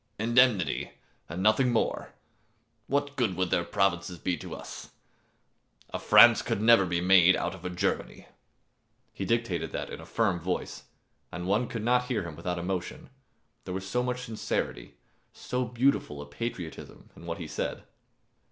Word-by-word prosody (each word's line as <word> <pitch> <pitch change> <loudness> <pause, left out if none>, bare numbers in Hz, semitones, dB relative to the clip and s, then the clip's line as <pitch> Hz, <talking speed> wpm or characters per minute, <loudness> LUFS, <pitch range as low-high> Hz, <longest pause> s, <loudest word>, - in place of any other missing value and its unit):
"Indemnity, 120 -3 +2 0.4
and 85 +4 -4
nothing 110 +4 +4
more 115 - -1 0.7
what 145 +1 -1
good 115 -9 0
would 95 -1 -1
their 85 - +2
provinces 90 -2 0
be 90 +1 -1
to - - -7
us? - - -9 1.0
A - - -3
France - - +7
could - - -2
never 110 -3 +5
be 85 0 0
made 90 0 +6
out - - -2
of - - -12
a - - -1
Germany." 90 - -2 0.9
He 95 - -4
dictated 115 -3 -1
that - - -4
in - - -7
a - - -11
firm 105 -6 0
voice, 90 +2 -4 0.5
and 90 +1 -5
one 105 +6 +1
could 115 -2 -5
not 125 +1 +2
hear 125 -6 -1
him 85 -3 -7
without 90 +3 -3
emotion, 90 +5 -4 0.5
there 90 - -4
was 95 0 -5
so 125 +5 0
much 125 0 -2
sincerity, 110 - -4 0.4
so 125 0 -3
beautiful 120 - 0
a 70 - -7
patriotism 85 +2 -7
in 85 - -12
what 85 - -3
he 85 - -6
said. - - -4
95 Hz, 160 wpm, -28 LUFS, 90-120 Hz, 1.0 s, France